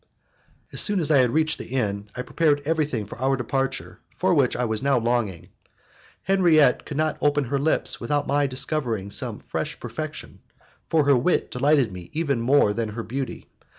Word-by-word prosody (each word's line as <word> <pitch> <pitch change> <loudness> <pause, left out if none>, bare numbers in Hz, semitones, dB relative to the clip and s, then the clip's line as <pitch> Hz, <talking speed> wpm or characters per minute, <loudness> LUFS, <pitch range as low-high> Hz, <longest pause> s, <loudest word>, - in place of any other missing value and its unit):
As - - 0
soon 205 -2 +2
as 160 -2 0
I 140 - +6
had 125 -2 +4
reached 155 +2 +1
the - - -7
inn, 105 -5 -2
I 125 - -4
prepared 145 0 +1
everything 150 -8 -1
for 105 - -10
our 135 +1 +1
departure 135 +2 -3 0.2
for - - +2
which - - +2
I 125 - 0
was 110 -2 -2
now 140 -1 +2
longing. 115 -7 -1 0.7
Henriette 170 -8 +3
could 145 - -5
not 155 0 0
open 145 0 +2
her 135 +2 -1
lips 155 +3 0
without 145 -1 0
my 145 0 +1
discovering 125 -7 -1
some - - -2
fresh - - -5
perfection, - - -7 0.5
for 160 -2 +3
her 140 -1 +5
wit 125 +9 +1
delighted 135 -3 +2
me 90 -2 -9
even 145 -6 0
more 120 -4 +3
than 115 0 -2
her 115 +2 -5
beauty. 130 +2 -5
135 Hz, 185 wpm, -24 LUFS, 115-150 Hz, 0.7 s, I